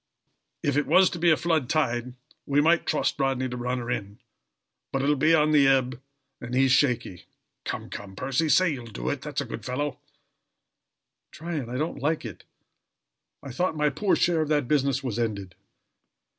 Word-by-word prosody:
If 145 -1 +1
it 145 - +1
was 190 0 +5
to 175 - -5
be 170 +1 +4
a 155 - +5
flood 160 -7 0
tide 125 -5 0 0.3
we 140 +1 +2
might 165 +3 +3
trust 150 - 0
Rodney 135 -2 0
to 125 - -5
run 125 +1 -2
her 120 0 -4
in: 100 -3 -4 0.7
but 135 0 -1
it - - +1
will 150 - +3
be 155 +4 +4
on 155 -1 +3
the 145 -3 +5
ebb, 130 -2 +1 0.4
and 120 +1 -5
he 135 +1 +4
is 130 - +2
shaky. 125 - +1 0.4
Come, - - -4
come, 95 -2 -8
Percy, 135 +8 -1
say 185 0 +4
you'll 120 -4 -8
do 60 - -4
it, - - -4
that's - - -3
a - - -4
good - - -7
fellow!!" 135 +3 -3 1.3
"Tryon, 155 -7 -5
I 125 - -4
don't 155 0 -3
like 150 0 -1
it. 110 -7 -9 1.0
I 135 - -7
thought 165 +4 -1
my 150 -1 +2
poor 200 +5 +1
share 170 -2 +2
of 155 - -2
that 145 -4 +1
business 140 -1 +1
was 120 -3 -3
ended." 100 -5 -3
135 Hz, 195 wpm, -26 LUFS, 125-155 Hz, 1.3 s, was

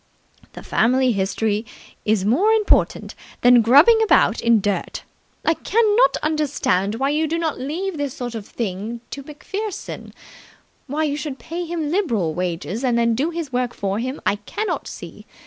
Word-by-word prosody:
"The - - -10
Family 255 +1 +2
History 205 +1 -1 0.4
is 210 -3 +1
more 365 - +3
important 435 -2 +1 0.3
than 245 -1 +7
grubbing 290 - +6
about 445 - +3
in 235 0 +4
the 215 - +2
dirt. 205 0 -2 0.4
I 325 - +4
cannot 440 +6 +2
understand 285 -10 0
why 270 +4 0
you 310 +2 +1
do 330 +2 -1
not 325 -3 -2
leave 330 +7 -3
this 285 -3 -3
sort 245 -1 -5
of 220 -3 -7
thing 220 +2 -4
to 280 - -6
MacPherson. 390 +9 -6 0.8
Why 295 +3 -1
you 290 -2 0
should 295 -3 -5
pay 345 +4 -5
him 325 -3 -3
liberal 230 - 0
wages 180 - -3
and 245 -2 +2
then 235 0 +2
do 275 +8 0
his 330 -5 -5
work 245 -1 -1
for 200 +1 -2
him, 260 +4 -4
I 205 - +2
cannot 410 - -4
see. - - -10
265 Hz, 165 wpm, -21 LUFS, 225-325 Hz, 0.8 s, than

